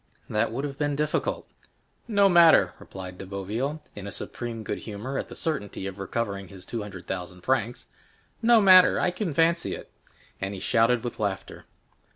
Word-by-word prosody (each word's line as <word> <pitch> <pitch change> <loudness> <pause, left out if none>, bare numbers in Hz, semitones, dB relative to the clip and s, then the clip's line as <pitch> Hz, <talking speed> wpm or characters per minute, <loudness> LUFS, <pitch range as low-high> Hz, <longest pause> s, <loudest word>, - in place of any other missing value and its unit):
"That 105 +1 +1
would 130 +5 -3
have 140 -1 -5
been 145 -1 0
difficult." 150 +1 -1 0.6
"No 200 -3 +4
matter," 170 -3 +6
replied 95 -1 -9
De - - -6
Boville, 110 +11 -3
in 100 0 -6
supreme 115 +2 -5
good - - -3
humor 115 +6 -5
at - - -5
the - - -9
certainty 105 -12 -3
of 95 0 -6
recovering 100 -1 -3
his 95 0 -12
two 115 - -4
hundred 100 -3 -8
thousand 90 -1 -5
francs,—"no 130 - 0
matter, 185 -2 +7
I 180 - +2
can 180 -1 -3
fancy 165 +2 +2
it." - - -11 0.5
And 95 +1 -3
he - - -6
shouted 115 +4 +2
with 120 - -5
laughter. 100 -2 -3
115 Hz, 170 wpm, -26 LUFS, 100-150 Hz, 0.6 s, matter